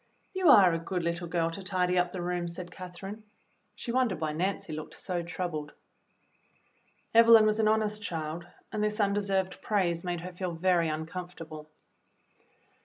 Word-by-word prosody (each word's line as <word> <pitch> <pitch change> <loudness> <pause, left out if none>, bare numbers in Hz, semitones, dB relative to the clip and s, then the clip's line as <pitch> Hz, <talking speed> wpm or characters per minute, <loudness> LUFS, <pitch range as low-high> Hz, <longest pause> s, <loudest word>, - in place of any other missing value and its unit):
"You 375 -3 +3
are 195 -9 +8
a 165 - 0
good 175 +1 -3
little 170 +1 -2
girl 165 -1 0
to 195 - -6
tidy 185 -1 0
up 180 0 +2
the 180 -1 -4
room," 175 0 -1
said 175 +1 -6
Catherine. 190 +4 -8 0.5
She 235 - -5
wondered 240 -8 +1
why 155 -1 -1
Nancy 180 0 -2
looked 155 0 -7
so 180 -2 -3
troubled. 170 -3 -4 1.4
Evelyn 230 -1 +8
was 215 0 +2
an 220 - +3
honest 215 -1 +1
child, 165 -2 -4 0.2
and 215 -1 -1
this 210 +1 -1
undeserved 200 -2 0
praise 175 -5 0
made 175 -2 -3
her 180 +1 -7
feel 180 -1 -3
very 170 -1 +2
uncomfortable. 160 -1 -6
180 Hz, 160 wpm, -29 LUFS, 170-200 Hz, 1.4 s, are